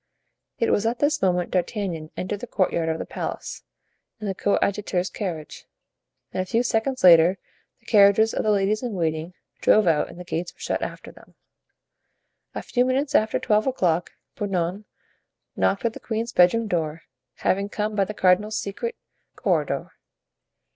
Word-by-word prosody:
It 230 - +1
was 210 +2 +2
at 235 +2 0
this 295 +2 +1
moment 180 -2 +1
D'Artagnan 180 -4 -2
entered 205 +2 -3
the 245 - -7
courtyard 170 -6 0
of 160 - -1
the - - -5
palace, - - -5 0.6
in 215 - -6
the 195 - -1
coadjutor's 195 -1 0
carriage, 170 -7 -6 0.7
and - - 0
a - - -3
few 230 +5 +1
seconds 250 +3 -1
later 175 +1 +7 0.4
the - - -33
carriages 210 +1 +5
of - - 0
the 215 - +1
ladies 205 +1 +2
in 245 -3 -3
waiting 165 0 -2 0.2
drove 215 -1 +4
out 160 -3 +2
and 175 - -12
the - - -6
gates 175 0 -4
were - - -33
shut - - -2
after - - -6
them. - - -19 1.2
A - - -4
few 245 - +1
minutes 270 +3 0
after 220 -6 +3
twelve 215 +3 +1
o'clock 180 -10 0 0.2
Bernouin 195 0 -2 0.7
knocked 195 - +1
at 230 - +1
the - - -9
queen's 225 +1 -3
bedroom 180 +6 +4
door, 165 -4 -2 0.3
having 200 +2 0
come 210 +1 -2
by 200 -2 +2
the 210 - -7
cardinal's 205 +4 +2
secret 455 - -4 0.4
corridor. - - -1
200 Hz, 165 wpm, -24 LUFS, 180-220 Hz, 1.2 s, later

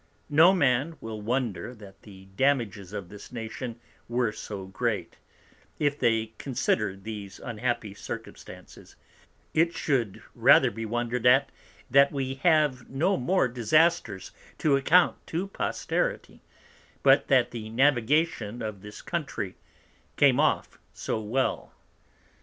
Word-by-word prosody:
No 160 +5 +7
Man 145 -2 +1
will 110 -1 -7
wonder 120 +1 -2
that 100 -3 -14
the 95 -2 -14
Damages 115 -8 0
to 105 - -5
this 100 +2 -13
Nation 115 0 -6 0.3
were 120 -2 +1
so 100 -2 -7
great, 95 0 -3 0.6
if 145 -1 0
they 115 -1 +1
consider 105 -6 -1
these 100 -1 -8
unhappy 115 -2 -3
Circumstances: - - -10 0.6
it 165 +2 +2
shou'd 120 -9 -1
rather - - +5
be 115 0 -5
wonder'd 120 +1 -1
at, 135 +3 +5 0.4
that 140 +1 +6
we 135 -2 -2
have 150 -7 +2
no 165 +9 +1
more 180 +2 +1
Disasters 125 - +1 0.3
to 150 -3 +2
account 170 +6 +4
to 170 +4 -2
Posterity, 195 - -3 0.6
but - - +5
that - - +3
the 110 -2 -6
Navigation 120 -2 +1
of 105 -3 -5
this 105 +1 -11
Country 145 - -4 0.6
came - - +5
off - - 0 0.2
so 110 - -3
well. 120 +5 -2
120 Hz, 125 wpm, -27 LUFS, 110-140 Hz, 0.6 s, No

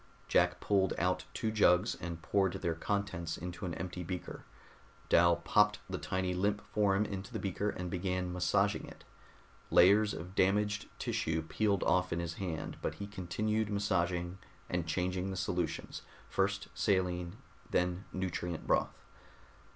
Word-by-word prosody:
Jack - - +3
pulled 95 -2 +2
out 90 +1 0
two 110 - -1
jugs 105 -1 +4
and 85 -1 -6
poured 95 -1 +2
their 85 - -1
contents 95 -1 -2
into 90 +1 -6
an 85 - -3
empty 90 +1 -5
beaker. 90 +1 -6 0.6
Dal 85 0 +6
popped 105 +4 +3
the - - -4
tiny 95 0 -1
limp 100 +3 0
form 105 -1 +3
into 100 -1 -5
the - - -3
beaker 100 +2 -1
and 90 -3 -4
began 90 -1 -1
massaging 95 +3 +1
it. - - -13 0.7
Layers 100 +4 +6
of 90 +3 -7
damaged 105 +2 +2
tissue 80 0 -1
peeled 100 +4 +1
off 90 0 +2
in 85 - 0
his 85 -1 -3
hand, 85 -5 -4
but - - -2
he 100 - -5
continued 105 +2 -1
massaging 90 -3 0 0.3
and 90 -2 -1
changing 90 +3 -1
the 95 - -4
solutions, 90 -2 -2 0.3
first - - 0
saline, 90 -1 0 0.3
then 90 +1 0
nutrient 90 -2 -3
broth. - - 0
90 Hz, 145 wpm, -33 LUFS, 85-100 Hz, 0.7 s, Dal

